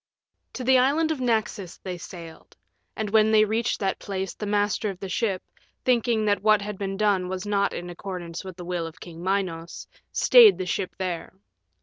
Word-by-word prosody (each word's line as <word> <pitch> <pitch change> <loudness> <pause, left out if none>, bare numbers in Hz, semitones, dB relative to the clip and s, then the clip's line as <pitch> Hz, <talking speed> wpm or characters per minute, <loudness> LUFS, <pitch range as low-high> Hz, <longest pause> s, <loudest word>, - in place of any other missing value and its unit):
VII - - -57
To 255 - -5
the 260 +1 +5
Island 300 +5 +2
of 295 -5 -3
Naxos 220 -6 -1
they 185 -2 -6
sailed. 165 -1 -11 0.4
And 215 -2 -3
when 220 0 +4
they 215 -1 +6
reached 225 +3 -1
that 195 -2 -1
place 195 -2 -4
the 210 - -6
master 205 +1 +1
of 190 -2 -7
the 195 - -5
ship, 195 -2 -1 0.4
thinking 235 -3 +2
that 205 -1 +2
what 215 -1 +4
had 210 -1 -6
been 195 -1 -3
done 200 -3 +1
was 185 +1 -4
not 200 -1 +1
in 175 - -6
accordance 175 -1 -6
with 185 -2 -9
the 175 - -8
will 175 -2 -2
of 165 - -12
King 170 -1 -10
Minos, 180 -3 -2 0.3
stayed 465 -5 +7
the 185 - -3
ship 185 0 -3
there. 180 -1 -4
200 Hz, 200 wpm, -25 LUFS, 180-220 Hz, 0.4 s, stayed